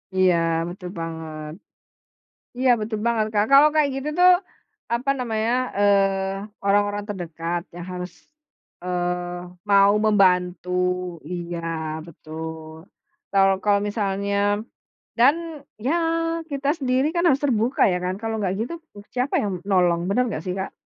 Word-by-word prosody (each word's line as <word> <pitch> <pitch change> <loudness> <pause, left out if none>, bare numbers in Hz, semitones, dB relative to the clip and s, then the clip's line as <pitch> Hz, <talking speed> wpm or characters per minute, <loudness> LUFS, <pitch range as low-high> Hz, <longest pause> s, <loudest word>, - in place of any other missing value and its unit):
Iya, 185 -2 +4 0.3
betul 180 0 -8
banget. 160 -2 -6 1.1
Iya, 255 -1 +3
betul 215 0 -3
banget 225 -2 +2
Kak. 205 0 +3
Kalau 285 +2 +8
kayak 295 -2 +3
gitu 270 +2 -3
tuh, 365 0 +8 0.6
apa 255 +4 0
namanya, 225 -2 -1 0.3
eee, 195 0 +1
orang-orang 205 +1 +2
terdekat 170 -2 -4
yang 175 0 -7
harus, 180 -1 -5 0.7
eee, 180 0 -3 0.2
mau 200 0 +6
membantu 180 -4 +3 0.6
iya, 175 -1 -4 0.5
betul. 160 0 -8 0.6
Kal 195 -1 +5 0.2
kalau 200 -1 +3
misalnya 200 -1 -1 0.8
dan 265 +6 +6 0.5
ya 310 - +2 0.6
kita 280 0 -2
sendiri 260 +1 +1
kan 340 +1 +1
harus 275 -2 +3
terbuka 240 -1 +1
ya 180 - 0
kan. 185 +1 -1
Kalau 225 0 -2
nggak 190 -1 0
gitu, 240 +9 -3 0.4
siapa 255 +3 -1
yang 205 - -1
menolong, 180 -4 +2
benar 245 +6 +2
nggak 160 -7 -4
sih 180 - -2
Kak? 190 - -4
200 Hz, 130 wpm, -23 LUFS, 180-225 Hz, 1.1 s, Kalau